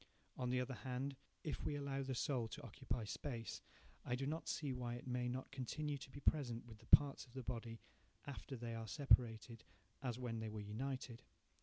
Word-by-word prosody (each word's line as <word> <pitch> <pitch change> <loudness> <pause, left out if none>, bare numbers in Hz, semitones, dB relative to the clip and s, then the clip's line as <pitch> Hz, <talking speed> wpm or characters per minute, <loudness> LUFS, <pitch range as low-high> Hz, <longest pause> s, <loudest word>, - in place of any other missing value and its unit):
On 125 -1 0
the 125 0 +3
other 125 +1 0
hand, 130 +2 -2 0.3
if 155 - -2
we 145 - +1
allow 140 -1 0
the 135 -1 -1
soul 120 -2 +2
to - - -7
occupy 120 +1 -2
space, 115 +1 -3 0.4
I 125 - +1
do 135 +2 -1
not 155 +3 -1
see 145 -4 0
why 120 -1 -1
it 120 - -7
may 125 -1 +1
not 130 +2 -3
continue 140 +2 -1
to 130 - -8
be 140 - -7
present 125 -7 +2
with 110 -2 -10
the 115 - -17
parts 145 -2 +7
of 120 - -18
the 130 - -3
body 115 -1 -3 0.4
after 140 -1 -5
they 120 -1 -3
are 115 0 -3
separated, 115 -4 +4 0.4
as 125 -4 -1
when 120 -3 -1
they 110 0 -2
were 110 0 -4
united. 120 +3 -3
125 Hz, 200 wpm, -42 LUFS, 115-135 Hz, 0.4 s, parts